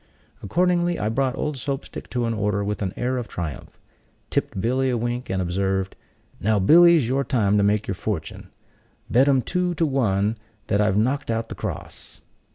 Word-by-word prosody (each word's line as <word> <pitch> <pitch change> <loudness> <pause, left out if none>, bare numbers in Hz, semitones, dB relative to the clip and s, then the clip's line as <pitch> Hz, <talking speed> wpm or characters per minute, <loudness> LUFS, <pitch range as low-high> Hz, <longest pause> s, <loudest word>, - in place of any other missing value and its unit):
Accordingly, 175 - +1
I 105 - -1
brought 130 +2 0
old 150 -2 -2
Soap 135 +2 -3
stick - - -9
to 120 -2 -1
an 115 - 0
order 105 -2 0
with 105 +1 -3
an 95 -2 -1
air 130 +1 -1
of 120 - -4
triumph; 80 -5 -6 0.5
tipped - - -1
Billy 130 +5 +1
a 125 - 0
wink, 120 +2 -3
and 95 - -1
observed, 95 +1 -1 0.4
"Now, 110 +1 +2
Billy, 170 - +7
's 130 -8 0
your 135 +3 +1
time 105 -7 +1
to - - +3
make 105 +1 +1
your 100 - -1
fortune. - - -5 0.6
Bet 130 +4 +5
'em 135 -3 +3
two 180 -1 -1
to 165 - +1
one 110 -6 0 0.3
that 100 - +1
I've 105 -1 +2
knocked 130 +6 0
out 115 0 -1
the - - -5
cross." - - -7
115 Hz, 190 wpm, -23 LUFS, 100-135 Hz, 0.6 s, Billy